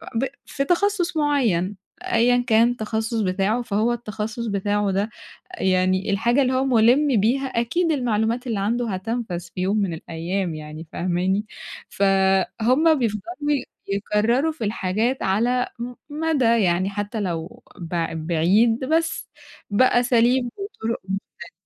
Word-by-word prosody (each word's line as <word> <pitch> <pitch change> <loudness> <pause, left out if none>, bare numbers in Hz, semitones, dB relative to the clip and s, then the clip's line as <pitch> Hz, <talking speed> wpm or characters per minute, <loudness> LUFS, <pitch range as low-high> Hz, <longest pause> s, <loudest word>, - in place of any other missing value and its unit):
ب 235 +4 +1 0.2
في 275 - -2
تخصُص 360 0 +1
معين 230 - +1 0.3
أيًّا 245 -9 +3
كان 230 0 +5
التخصُص 220 -1 -2
بتاعه 195 +4 0
فهو 230 +1 0
التخصُص 220 0 -4
بتاعه 205 0 0
ده 200 +3 0 0.5
يعني 185 +1 +1
الحاجة 235 +7 +2
اللي 260 -1 +1
هو 260 +1 +1
مُلم 250 +1 +4
بيها، 255 +6 +1
أكيد 265 +8 0
المعلومات 235 -2 0
اللي 225 -5 -1
عنده 230 +3 -1
هتنفذ 195 -1 -3
في 175 +1 -9
يوم 195 +4 +1
من 195 -5 0
الأيام 170 +2 -3
يعني 155 +1 -8
فاهماني، 185 +3 0 0.4
فُهم 200 - +2
بيفضَلوا 270 - -2 0.2
يكرروا 215 +9 +1
في 305 -7 -6
الحاجات 215 +5 -1
على 240 +6 +1
م 240 +1 -5 0.2
مَدَى 305 -2 0 0.2
يعني 185 +2 +1
حتى 205 +2 -4
لو 170 -3 -4 0.2
بع 170 -1 -3
بعيد 180 +9 +2
بس 325 +4 0 0.4
بأساليب 245 +2 +3
وطرق 310 - -4
مختلفة. 190 -2 -6
220 Hz, 125 wpm, -23 LUFS, 190-250 Hz, 0.5 s, كان